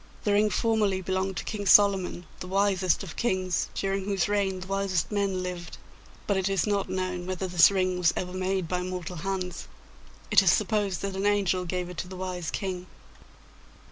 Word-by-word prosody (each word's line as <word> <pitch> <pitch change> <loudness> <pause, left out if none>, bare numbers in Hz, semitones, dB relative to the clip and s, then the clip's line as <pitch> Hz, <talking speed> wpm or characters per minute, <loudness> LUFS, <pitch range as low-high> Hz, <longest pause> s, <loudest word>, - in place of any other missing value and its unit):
The 205 - +2
ring 210 +1 +4
formerly 210 -2 +1
belonged 190 0 -2
to - - -3
King 205 -2 -4
Solomon, 195 -4 +4
the 180 - -6
wisest 190 -2 +1
of 170 -5 -8
kings, 185 -8 0
during 195 0 -1
whose 195 -3 0
reign 200 -2 0
the - - -6
wisest 190 -4 -1
men 200 -3 0
lived. 180 -1 -6 0.5
But 200 - +1
it 190 0 0
is 195 -3 +1
not 200 -2 0
known 185 -1 -3
whether 185 0 -2
this 180 -2 +6
ring 185 -2 0
was 170 -2 +4
ever 180 0 -3
made 185 -1 -1
by 180 +1 -1
mortal 180 -1 -5
hands: 180 0 -4 0.6
it - - +7
is - - +5
supposed 205 -4 0
that 195 -1 -3
an 195 +1 0
angel 195 -3 +1
gave 180 0 -3
it 180 - -9
to - - -4
the 185 0 -8
wise 180 -3 -4
King. 185 -1 -4
185 Hz, 190 wpm, -27 LUFS, 180-195 Hz, 0.6 s, it